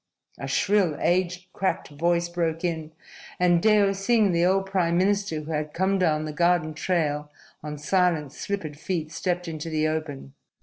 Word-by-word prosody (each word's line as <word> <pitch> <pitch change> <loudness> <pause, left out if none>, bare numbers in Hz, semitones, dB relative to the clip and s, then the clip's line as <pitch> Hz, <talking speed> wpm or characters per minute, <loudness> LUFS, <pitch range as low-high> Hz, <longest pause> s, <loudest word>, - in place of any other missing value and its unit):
a - - -5
shrill, 195 -7 +2
age 180 +1 0
cracked 190 - -1
voice 170 +3 0
broke 170 -1 -2
in, 160 -3 -2 0.5
and 175 -1 +4
Deo 205 -2 +4
Singh, 200 +1 +2
the 170 0 +2
old 190 +2 +2
prime 180 -3 +1
minister 195 -4 +1
who 155 +2 -7
had 150 -1 -3
come 190 +2 +1
down 155 -4 +1
the 155 - -5
garden 170 -1 +2
trail 150 -3 -1 0.3
on 150 0 -6
silent, 155 -2 +1
slippered 155 -5 -5
feet, 165 -3 -3
stepped 180 +1 -2
into 160 0 -5
the 155 -1 +1
open. 155 -3 -4
170 Hz, 165 wpm, -25 LUFS, 155-185 Hz, 0.5 s, and